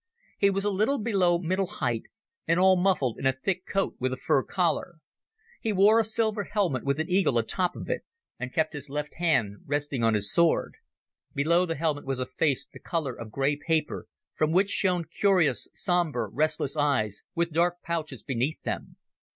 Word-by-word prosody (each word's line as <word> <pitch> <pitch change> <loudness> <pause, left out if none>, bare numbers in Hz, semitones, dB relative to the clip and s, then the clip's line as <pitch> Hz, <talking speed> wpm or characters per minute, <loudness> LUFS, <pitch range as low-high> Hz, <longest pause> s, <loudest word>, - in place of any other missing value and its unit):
He 200 - +5
was 195 +1 -1
a 205 - +2
little 215 +9 +1
below 195 -7 +2
middle 185 +2 -1
height, 120 - -2 0.4
and 165 +2 +3
all 190 0 +6
muffled 180 - +1
in 135 - +1
a - - +5
thick 185 +7 -3
coat 195 -1 -1
with 130 +1 0
a 130 - -3
fur 135 - +2
collar. 175 +2 -1 0.6
He 225 - -1
wore 205 +3 +5
a - - +4
silver 220 -1 -1
helmet 190 - 0
with 140 +1 0
an 160 - -1
eagle 185 -9 +2
atop 175 +11 0
of - - -7
it, - - -1 0.4
and 130 0 -4
kept 160 +2 0
his 145 -1 -6
left 150 +1 -4
hand 120 - +1
resting 145 -3 -1
on 115 -1 +3
his 105 0 +1
sword. 170 -1 +3 0.6
Below 170 +6 +3
the 165 - -2
helmet 150 -1 -1
was 135 -1 -1
a 130 - -1
face 130 +2 0
the - - -15
colour 155 -7 -2
of 115 -1 -8
grey 135 +5 0
paper, 155 +1 -1 0.3
from 155 0 +1
which 195 +4 +3
shone 180 -3 +1
curious 170 - +2
sombre 170 - 0
restless 150 +3 -1
eyes 135 -9 0
with 170 0 0
dark 175 +2 +1
pouches 155 -9 -4
beneath 130 +5 -1
them. - - -4
160 Hz, 190 wpm, -27 LUFS, 135-185 Hz, 0.6 s, all